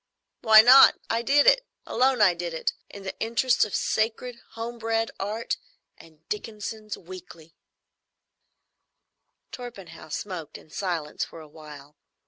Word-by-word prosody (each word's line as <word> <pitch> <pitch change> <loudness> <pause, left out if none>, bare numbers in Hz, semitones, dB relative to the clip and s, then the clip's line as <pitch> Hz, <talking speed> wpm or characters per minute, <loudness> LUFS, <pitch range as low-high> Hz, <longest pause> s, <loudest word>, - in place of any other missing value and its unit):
"Why 220 -1 +8
not? 255 +3 +8
I 230 - 0
did 285 +4 +3
it. - - +5 0.2
Alone 260 -2 +1
I 185 -3 +5
did 170 -1 -5
it, 160 - -1 0.2
in 200 - -11
the 190 - -6
interests 235 +3 +2
of 205 - -5
sacred, 230 +2 -2
home 235 +1 -6
bred 225 0 -1
Art 215 +4 -3 0.4
and 160 -1 -20
Dickenson's 215 0 -6
Weekly." 170 -2 -13 2.0
Torpenhow 200 -10 -10
smoked 165 -2 -6
in 155 - -19
silence 170 -6 -3
for 165 - -9
a 155 - -12
while. 150 -1 -14
210 Hz, 130 wpm, -25 LUFS, 165-230 Hz, 2.0 s, Why